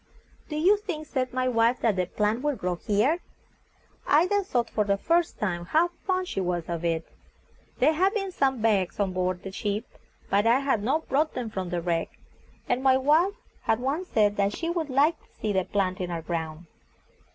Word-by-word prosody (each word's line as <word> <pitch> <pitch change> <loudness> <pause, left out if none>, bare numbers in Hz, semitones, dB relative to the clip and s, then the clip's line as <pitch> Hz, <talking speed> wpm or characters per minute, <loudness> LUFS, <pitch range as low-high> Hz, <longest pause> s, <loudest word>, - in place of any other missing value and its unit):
"Do 300 - -4
you 365 +7 +4
think," 355 -7 -5
said 255 -4 -2
my 255 0 0
wife, 235 0 +2
"that 225 -4 +2
the 180 -1 0
plant 210 +5 0
would 295 -2 0
grow 180 0 -1
here?" 215 - +1 0.9
I 305 +4 +5
then 405 +2 +1
thought 240 -9 0
for 215 - +1
the 200 -1 +1
first 335 +9 +1
time 175 -4 -2
how 325 - +3 0.2
fond 370 -1 0
she 195 - -2
was 175 -2 -1
of 170 -1 -4
it. 165 -1 -1 0.7
There 300 +5 +4
had 375 +6 +2
been 390 -3 -1
some 265 -8 0
bags 200 -5 +1
on 195 -2 0
board 185 0 -1
the 195 - -6
ship, 205 +3 -2 0.4
but 200 +3 +2
I 245 +4 +4
had 270 -6 +1
not 280 +9 0
brought 305 +3 +1
them 240 -3 -4
from 190 -4 -4
the 175 -1 -2
wreck; 165 -1 -1 0.6
and 250 - +1
my 265 -1 +5
wife 315 +9 +3 0.3
had 220 - +1
once 285 +9 -2
said 210 -6 +2
that 200 0 +1
she 335 0 -2
would 330 -4 -2
like 290 +5 +3
to - - -30
see 210 -1 -1
the 190 -1 +1
plant 185 -2 -1
in 180 - -3
our 165 -2 -4
ground. 160 -1 -4
230 Hz, 210 wpm, -27 LUFS, 190-305 Hz, 0.9 s, I